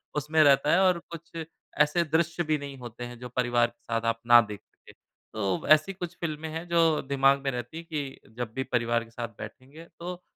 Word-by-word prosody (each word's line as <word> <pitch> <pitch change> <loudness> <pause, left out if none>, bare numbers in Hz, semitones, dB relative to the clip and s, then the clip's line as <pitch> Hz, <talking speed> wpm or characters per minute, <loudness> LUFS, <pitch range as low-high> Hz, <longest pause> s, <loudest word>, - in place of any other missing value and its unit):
उसमें 150 +2 +2
रहता 140 +1 +5
है 185 - +5
और 180 -2 +4
कुछ 170 0 -9 0.5
ऐसे 160 +3 +1
दृश्य 170 +2 0
भी 155 - +3
नहीं 140 -1 -8
होते 120 0 -8
हैं 120 0 -7
जो 125 0 -7
परिवार 120 -1 +2
के 120 - -21
साथ 115 - +1
आप 115 0 -2
ना 120 0 +9
देख 105 -2 -7
सकें। - - -20 0.4
तो 100 -4 0
ब - - -9
ऐसी 155 +6 +2
कुछ 175 -1 -6
फ़िल्में 160 -1 -3
हैं 165 +2 -6
जो 165 -2 +3
दिमाग 135 0 +4
में 135 - 0
रहती 125 +4 -6
हैं 165 - -8
कि 145 -4 -5 0.2
जब 120 -2 -3
भी 130 - -1
परिवार 120 -2 0
के 115 - -16
साथ 120 0 -4
बैठेंगे 140 +5 -10
तो 180 +1 -6
140 Hz, 220 wpm, -27 LUFS, 120-165 Hz, 0.5 s, ना